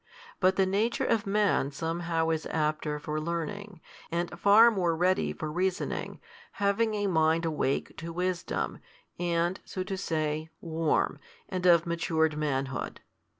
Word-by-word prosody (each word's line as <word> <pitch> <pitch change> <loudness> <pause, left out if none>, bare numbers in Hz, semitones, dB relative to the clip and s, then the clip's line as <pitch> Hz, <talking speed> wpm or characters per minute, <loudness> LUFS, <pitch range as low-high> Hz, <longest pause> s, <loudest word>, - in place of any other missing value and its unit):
But 185 -1 +4
the 190 - +3
nature 205 +5 0
of 220 -3 +1
man 200 -8 +2
somehow 165 +2 -1
is 160 -1 -2
apter 150 -1 -1
for 150 +1 -3
learning, 170 +3 -4 0.3
and 170 +1 -1
far 205 +6 +6
more 175 -6 +1
ready 180 +3 +2
for 155 -1 -5
reasoning, 185 +2 -2 0.3
having 210 +2 +1
a 205 -1 -1
mind 165 -2 +2
awake 150 -4 -1
to 165 0 -6
|210 - - -11
wisdom, 180 0 -2 0.4
and 175 +1 0
(so 185 - -4
to 190 +1 -4
say) 155 -4 -2
warm, 160 -1 0 0.3
and 185 -2 0
of 170 -2 +6
matured 160 -2 +1
manhood. 135 -3 -2
170 Hz, 145 wpm, -29 LUFS, 160-190 Hz, 0.4 s, far